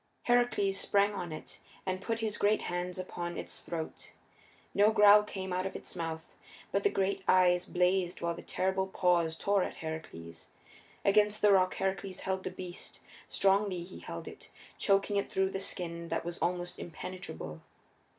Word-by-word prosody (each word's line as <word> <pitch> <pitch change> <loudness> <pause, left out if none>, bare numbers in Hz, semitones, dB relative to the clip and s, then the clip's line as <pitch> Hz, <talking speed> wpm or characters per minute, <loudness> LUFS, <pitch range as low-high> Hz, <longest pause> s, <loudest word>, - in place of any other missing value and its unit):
Heracles 240 -5 +2
sprang 200 +1 +2
on 175 -4 -4
it 155 - -9 0.3
and 185 0 -2
put 230 +2 -2
his 215 -2 -1
great 210 +1 +3
hands 175 +1 -3
upon 175 -1 -4
its - - -7
throat. 165 -2 -6 0.6
No 205 +2 +5
growl 210 -1 +8
came 190 -3 -5
out 185 +1 0
of - - -8
its - - -8
mouth, 160 -1 -5 0.4
but - - +2
the 410 - +3
great 195 - 0
eyes 180 -1 +5
blazed 180 0 +1
while 170 0 -1
the - - -8
terrible 190 0 0
paws 175 -4 +2
tore 200 +3 +2
at - - -2
Heracles. 125 - -7 0.6
Against 210 +1 +3
the 210 - +7
rock 185 -1 +4
Heracles 190 0 -2
held 190 0 -2
the - - -2
beast; 180 -1 -8 0.3
strongly 195 -2 +2
he 180 +2 -10
held - - -7
it, - - -11 0.3
choking 200 +1 +2
it 200 - 0
through 190 0 +1
the 195 - -3
skin 170 -3 -3
that - - -2
was 175 0 -4
almost 175 0 -2
impenetrable. 155 - -7
185 Hz, 170 wpm, -31 LUFS, 175-200 Hz, 0.6 s, growl